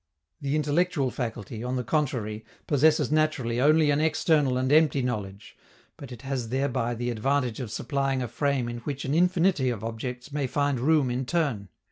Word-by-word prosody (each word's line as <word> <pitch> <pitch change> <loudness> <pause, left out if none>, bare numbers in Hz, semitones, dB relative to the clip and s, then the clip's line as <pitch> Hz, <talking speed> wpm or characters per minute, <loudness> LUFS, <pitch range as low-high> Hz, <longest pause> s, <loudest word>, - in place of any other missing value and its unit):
The 140 +1 -1
intellectual 150 -2 +1
faculty, 115 -2 -5
on 125 +1 -2
the 125 - -1
contrary, 120 -6 -1 0.2
possesses 150 0 +3
naturally 140 -6 +1
only 155 +1 +4
an 145 - +2
external 150 -4 +2
and 130 +1 0
empty 150 -3 +4
knowledge; 105 -5 -5 0.4
but 135 -3 -10
it 120 0 -10
has 130 -4 -3
thereby 125 -2 -1
the 120 +1 -2
advantage 125 +1 0
of 125 -4 -4
supplying 135 +2 -1
a - - -3
frame 140 -2 -1
in 120 0 -5
which 140 +3 -5
an 135 - -1
infinity 175 -4 +2
of 115 -4 -4
objects 125 +4 -5
may 140 -2 -1
find 145 0 0
room 145 -1 +2
in 125 +1 -2
turn. 135 - -1
135 Hz, 175 wpm, -26 LUFS, 120-150 Hz, 0.4 s, only